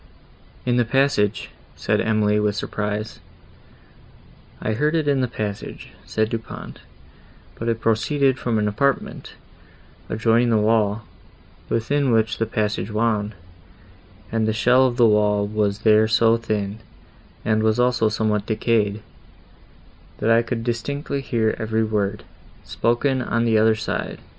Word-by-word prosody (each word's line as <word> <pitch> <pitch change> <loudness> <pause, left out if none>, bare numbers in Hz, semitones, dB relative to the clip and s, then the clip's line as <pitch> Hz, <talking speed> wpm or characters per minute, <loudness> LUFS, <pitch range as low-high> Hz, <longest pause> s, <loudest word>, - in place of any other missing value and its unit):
"In 120 -1 +1
the 120 - +4
passage!" 115 -5 +1 0.2
said - - 0
Emily, 105 -1 +2
with 105 -1 0
surprise. 105 +1 -4 1.4
"I 110 - -2
heard 150 +8 0
it 155 -2 0
in 140 -2 +2
the 125 - +1
passage," 105 -4 -6 0.2
said 110 0 -1
Du 115 - -2
Pont, 115 - -10 0.7
"but 115 - -4
it 115 -1 -1
proceeded 130 +4 +1
from 120 -2 -1
an 105 -1 +1
apartment, 135 +7 -1 0.8
adjoining 115 +2 +2
the 115 - +3
wall, 105 0 +1 0.7
within 135 +4 0
which 110 0 +1
the 115 - 0
passage 105 -3 -2
wound, 105 -1 -1 1.0
and 110 -1 0
the 110 - +1
shell 125 +4 +4
of 120 -1 -4
the 120 - +5
wall 105 -1 +3
was 105 0 -1
there 110 0 +5
so 115 +1 +4
thin, 105 -2 -3 0.7
and 110 0 +2
was 110 +1 +1
also 125 -3 +2
somewhat 105 -1 -1
decayed, 110 -2 0 1.1
that 115 - +1
I 115 +1 +5
could 115 0 -4
distinctly 140 +4 -3
hear 115 -4 0
every 110 0 0
word, 105 -1 -1 0.4
spoken 130 +3 0
on 115 -1 0
the 110 -2 +3
other 110 0 +4
side. - - -4
110 Hz, 140 wpm, -22 LUFS, 105-120 Hz, 1.4 s, the